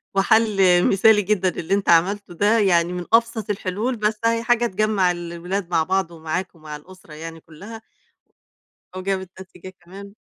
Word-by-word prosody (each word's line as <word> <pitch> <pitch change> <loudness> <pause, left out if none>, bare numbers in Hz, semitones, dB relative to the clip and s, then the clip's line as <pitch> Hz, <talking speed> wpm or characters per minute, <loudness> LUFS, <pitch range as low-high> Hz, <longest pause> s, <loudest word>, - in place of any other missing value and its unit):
وحل 195 -3 +3
مثالي 210 +2 +4
جدًا 190 -2 0
اللي 170 +1 -4
أنت 200 0 0
عملته 180 +3 +2
ده، 210 +6 +2
يعني 175 -3 +2
من 180 -1 -5
أبسط 230 -2 +1
الحلول، 205 +5 -2
بس 215 -1 -1
أهي 230 0 +1
حاجة 240 0 +2
تجمّع 205 -3 +1
الولاد 175 +2 -5
مع 165 -2 +1
بعض، 190 0 -1
ومعاك 170 +3 -5
ومع 155 -2 -9
الأسرة 170 +1 -15
يعني 165 +1 -9
كلّها. 205 +9 -12 1.2
وجابت 190 -1 -3
نتيجة 185 0 -13
كمان. 200 +3 -12
190 Hz, 150 wpm, -21 LUFS, 175-210 Hz, 1.2 s, مثالي